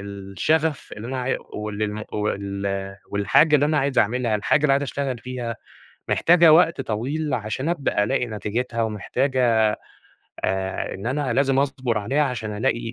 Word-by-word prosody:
الشغف 100 - -1
اللي 110 +3 -7
أنا 130 0 -3
عي 125 +1 -1
واللي 105 0 -3
الم 105 0 -4
وال 100 -1 -3
والحاجة 100 +10 +4
اللي 145 0 +4
أنا 150 0 +1
عايز 135 -1 0
أعملها، 120 +1 +1
الحاجة 105 +7 +1
اللي 150 -2 +4
عايز 140 +1 +2
أشتغل 135 -2 -3
فيها، 120 -1 -5 0.5
محتاجة 170 -2 +6
وقت 165 -2 +4
طويل، 135 +6 -2
عشان 120 +6 -2
أبدأ 140 -10 0
ألاقي 125 +3 0
نتيجتها، 115 +2 -3
ومحتاجة 115 0 +1 0.8
آآ 95 0 -2
إن 100 +4 -7
أنا 135 +1 -1
لازم 135 +1 +2
أصبر 130 -5 0
عليها، 130 +9 +1
عشان 110 -6 -3
ألاقي 115 0 -1
120 Hz, 155 wpm, -23 LUFS, 105-140 Hz, 0.8 s, محتاجة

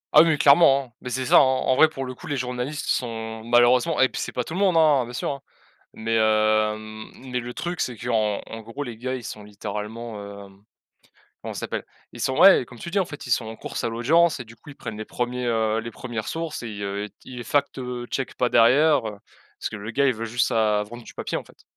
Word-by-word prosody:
Ah 150 - +11
oui, 160 -2 +3
clairement, 140 -1 +6
hein. 120 - -18
Bah, 125 - -6
c'est 130 +1 -2
ça, - - +6
hein. - - +10
En 130 -2 +3
en - - +4
vrai, 155 +3 +6
pour 135 -4 -5
le 130 - -5
coup, - - -12
les 145 - -2
journalistes 125 +4 -3
sont, 115 -2 -2
malheureusement 120 +6 +4
et 130 - +5
puis - - -5
c'est - - -4
pas 125 - -2
tout 160 - -8
le 185 - -2
monde, 190 -4 +3
hein, 150 -5 +4
bien 120 - -10
sûr, 125 - -2
hein. 140 - -6 0.5
Mais 115 +1 -2
hem, 110 0 +1
mais 125 -1 -4
le 120 0 -6
truc, 175 +4 -4
c'est 125 - -1
qu'en 110 -3 0
en 115 0 -7
gros, 115 +6 -8
les 120 -4 -7
gars, 130 +2 -3
ils 125 - -7
sont 105 -1 -7
littéralement, 105 0 -7
hem, 95 +1 -21 0.8
comment - - -5
ça - - -5
s'appelle? - - -4 0.3
Ils - - -10
sont, 130 - 0
ouais, 195 -6 +8
heu, - - -6
comme 120 -1 -14
tu 170 - -6
dis, 200 - -2
en 190 - +1
fait, 145 -5 -9
ils 125 - -5
sont 120 -1 +2
en 110 - -7
course - - -6
à - - 0
l'audience 155 +9 +3
et - - -5
du 115 - -14
coup, 145 +5 -14
ils - - -13
prennent 110 -5 -7
les 110 - -5
1ers, 125 +2 -3
heu, 110 -1 +1
les 115 - -7
1res 120 -4 -6
sources 165 -5 -4
et 110 -3 -6
heu, 100 +1 -3
t - - -39
ils 125 -2 -7
fact, 140 +5 0
heu, 125 -2 -5
checkent 135 - -3
pas 125 -1 +1
derrière, 135 +3 +5
heu, 105 -2 -7 0.4
parce - - -3
que - - -7
le 105 +2 -6
gars, 140 +4 +2
il 130 - +3
veut 115 +1 -4
juste 115 +2 +1
sa 105 -2 +2
vendre 120 +3 -10
du - - -12
papier, - - -3
en - - -5
fait. - - -21
120 Hz, 265 wpm, -24 LUFS, 110-135 Hz, 0.8 s, Ah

